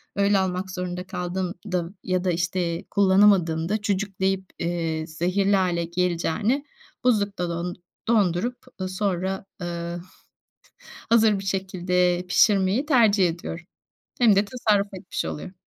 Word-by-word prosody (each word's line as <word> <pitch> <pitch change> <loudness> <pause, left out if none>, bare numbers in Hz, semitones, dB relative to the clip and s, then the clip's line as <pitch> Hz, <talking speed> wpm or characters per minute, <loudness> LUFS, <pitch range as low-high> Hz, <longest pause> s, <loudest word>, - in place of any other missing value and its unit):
öyle 200 0 +3
almak 190 0 -2
zorunda 180 0 -4
kaldığımda 180 -1 -3
ya 185 -1 0
da, 185 - +1
işte, 175 -1 -1
kullanamadığımda 190 -2 +3
cücükleyip, 195 -1 -1 0.2
eee, 165 -2 -2
zehirli 185 +5 +1
hâle 180 -3 +1
geleceğine 180 - 0 0.4
buzlukta 200 -7 +1
don 170 +1 -3 0.3
dondurup, 220 +2 +2 0.2
ııı, 185 - -2
sonra, 190 0 -2 0.2
ııı, 170 0 -4 1.1
hazır 220 -3 +5
bir 195 - -7
şekilde 180 -2 0
pişirmeyi 200 +6 +3
tercih 220 - +4
ediyorum. 165 0 -6 0.5
Hem 225 -5 +6
de 200 - +4
tasarruf 210 -3 +1
etmiş 185 0 -4
oluyorum. 180 +4 -6
185 Hz, 115 wpm, -24 LUFS, 175-200 Hz, 1.1 s, Hem